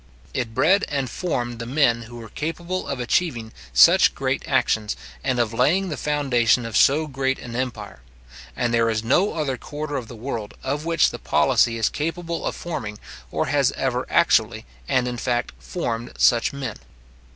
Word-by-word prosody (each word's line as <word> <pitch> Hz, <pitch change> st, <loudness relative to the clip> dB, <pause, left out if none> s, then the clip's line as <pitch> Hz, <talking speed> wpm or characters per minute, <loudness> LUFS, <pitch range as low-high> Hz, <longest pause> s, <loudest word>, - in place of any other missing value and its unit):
It 120 Hz, -4 st, -3 dB
bred 200 Hz, +2 st, +4 dB
and 140 Hz, -3 st, -2 dB
formed 120 Hz, -9 st, -3 dB
the 115 Hz, -, -5 dB
men 125 Hz, -3 st, +2 dB
who 115 Hz, +1 st, -11 dB
were 115 Hz, -1 st, -9 dB
capable 170 Hz, +4 st, -4 dB
of 140 Hz, -, -3 dB
achieving 120 Hz, -3 st, -1 dB, 0.2 s
such -, -, +6 dB
great -, -, -1 dB
actions, 105 Hz, -1 st, +1 dB, 0.3 s
and 130 Hz, -2 st, 0 dB
of 115 Hz, -2 st, 0 dB
laying 160 Hz, +11 st, +2 dB
the 150 Hz, -, -3 dB
foundation 125 Hz, -5 st, +2 dB
of 115 Hz, -, -5 dB
so 150 Hz, +3 st, +4 dB
great 135 Hz, -2 st, -1 dB
an 120 Hz, -1 st, -8 dB
empire; 125 Hz, -, -4 dB, 0.5 s
and 120 Hz, 0 st, 0 dB
there 115 Hz, -1 st, +3 dB
is 110 Hz, -1 st, -1 dB
no 175 Hz, -, +2 dB
other 145 Hz, -5 st, -1 dB
quarter 145 Hz, +1 st, -5 dB
of 120 Hz, -, -5 dB
the 120 Hz, -, -10 dB
world; 115 Hz, -3 st, -5 dB
of 145 Hz, +3 st, -2 dB
which 165 Hz, -2 st, +3 dB
the -, -, -7 dB
policy 115 Hz, -1 st, +2 dB
is 115 Hz, -, +2 dB
capable 165 Hz, +2 st, -3 dB
of -, -, -3 dB
forming, 110 Hz, -11 st, -5 dB, 0.3 s
or -, -, -1 dB
has -, -, +3 dB
ever -, -, -2 dB
actually, -, -, +2 dB, 0.2 s
and 125 Hz, -1 st, +1 dB
in 125 Hz, 0 st, -3 dB
fact, 120 Hz, 0 st, -1 dB
formed 120 Hz, -9 st, -4 dB
such 120 Hz, -1 st, +4 dB
men. 135 Hz, -6 st, -5 dB
125 Hz, 175 wpm, -23 LUFS, 115-150 Hz, 0.5 s, such